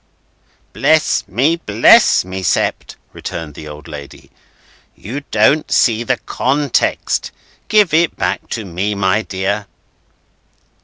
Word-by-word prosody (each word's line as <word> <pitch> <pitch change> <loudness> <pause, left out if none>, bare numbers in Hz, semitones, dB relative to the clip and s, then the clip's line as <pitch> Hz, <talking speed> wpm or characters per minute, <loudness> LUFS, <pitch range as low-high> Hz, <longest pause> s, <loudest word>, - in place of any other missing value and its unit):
"Bless - - +2
me, 140 - +1
bless 110 - +4
me, 95 +1 -6
Sept," 95 - -1 0.2
returned 80 -3 -7
the 75 - -10
old 75 0 -10
lady, 75 -3 -11 0.6
"you 125 +8 -6
don't 110 +8 +2
see 115 -2 +3
the 125 +1 0
context! 140 +1 -1 0.4
Give 210 -7 +3
it 165 0 +2
back - - -2
to 110 -3 -4
me, 95 +4 -3
my 100 +1 +1
dear." 100 +1 -3
105 Hz, 115 wpm, -16 LUFS, 95-135 Hz, 0.6 s, bless